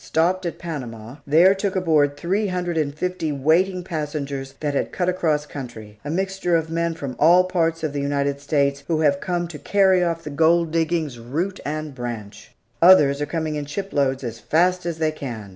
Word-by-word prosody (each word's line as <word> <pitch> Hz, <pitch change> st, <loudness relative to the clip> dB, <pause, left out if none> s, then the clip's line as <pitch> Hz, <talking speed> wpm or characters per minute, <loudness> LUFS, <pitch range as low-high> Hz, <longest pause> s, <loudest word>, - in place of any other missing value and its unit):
Stopped 180 Hz, +3 st, +1 dB
at 170 Hz, -, -5 dB
Panama; 125 Hz, -7 st, -7 dB
there 170 Hz, +6 st, +6 dB
took 195 Hz, 0 st, -2 dB
aboard 155 Hz, -6 st, +2 dB
three 195 Hz, +6 st, 0 dB
hundred 180 Hz, -2 st, -2 dB
and 145 Hz, -3 st, -1 dB
fifty 180 Hz, -2 st, -2 dB
waiting 170 Hz, +7 st, +2 dB
passengers 145 Hz, -5 st, -4 dB
that 145 Hz, -2 st, -2 dB
had 140 Hz, -, -1 dB
cut 180 Hz, -, -1 dB
across 160 Hz, -5 st, +1 dB
country 110 Hz, -7 st, -9 dB
a 145 Hz, -, -5 dB
mixture 190 Hz, +1 st, 0 dB
of 160 Hz, -1 st, -1 dB
men 170 Hz, 0 st, -1 dB
from 140 Hz, -5 st, -6 dB
all 175 Hz, +4 st, +6 dB
parts 165 Hz, -3 st, 0 dB
of 155 Hz, -2 st, -1 dB
the 145 Hz, -, -2 dB
United 140 Hz, 0 st, -1 dB
States, 140 Hz, -1 st, 0 dB
who 160 Hz, -2 st, 0 dB
have 140 Hz, -2 st, +3 dB
come 175 Hz, -1 st, -1 dB
to 160 Hz, -3 st, -9 dB
carry 190 Hz, -2 st, +3 dB
off 165 Hz, -1 st, -1 dB
the 150 Hz, -, -6 dB
gold 165 Hz, +2 st, +3 dB
diggings, 160 Hz, -5 st, -1 dB
root 160 Hz, +12 st, -3 dB
and 155 Hz, 0 st, -4 dB
branch! 120 Hz, -5 st, -7 dB, 0.3 s
Others 150 Hz, -6 st, +6 dB
are 145 Hz, -, -1 dB
coming 160 Hz, -1 st, -2 dB
in 145 Hz, -1 st, -4 dB
shiploads 140 Hz, -7 st, -1 dB
as 115 Hz, -2 st, -5 dB
fast 180 Hz, +5 st, +1 dB
as 170 Hz, -2 st, -3 dB
they 160 Hz, -1 st, +1 dB
can. 120 Hz, -9 st, -7 dB
155 Hz, 195 wpm, -22 LUFS, 140-175 Hz, 0.3 s, there